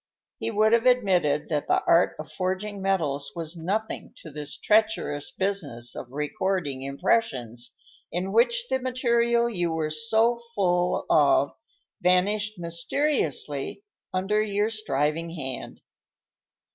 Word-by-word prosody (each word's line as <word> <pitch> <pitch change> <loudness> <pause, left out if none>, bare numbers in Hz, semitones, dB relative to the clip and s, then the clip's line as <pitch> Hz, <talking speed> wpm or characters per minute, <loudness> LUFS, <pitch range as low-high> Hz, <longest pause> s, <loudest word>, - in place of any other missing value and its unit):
He - - -2
would 215 0 +3
have 235 +2 +4
admitted 180 - +3
that 150 -2 -1
the - - +2
art 170 +2 +4
of 155 - -8
forging 195 +2 -3
metals 155 -8 0
was 165 0 -4
nothing 200 +7 -3
to 160 - -10
this 150 0 -6
treacherous 210 -9 +1
business 155 -12 -3
of 120 - -7
recording 150 +1 -2
impressions, 130 - -1 0.4
in 180 +3 -2
which 470 - +3
the 260 - 0
material 235 -2 +2
you 175 -7 -1
were 160 -1 -1
so 230 +5 +2
full 180 -2 +1
of 140 -1 +4 0.5
vanished 205 +4 +2
mysteriously 170 - -1 0.3
under 195 +3 +1
your 210 +1 0
striving 165 -6 -1
hand. 135 -5 -5
185 Hz, 120 wpm, -26 LUFS, 150-220 Hz, 0.5 s, have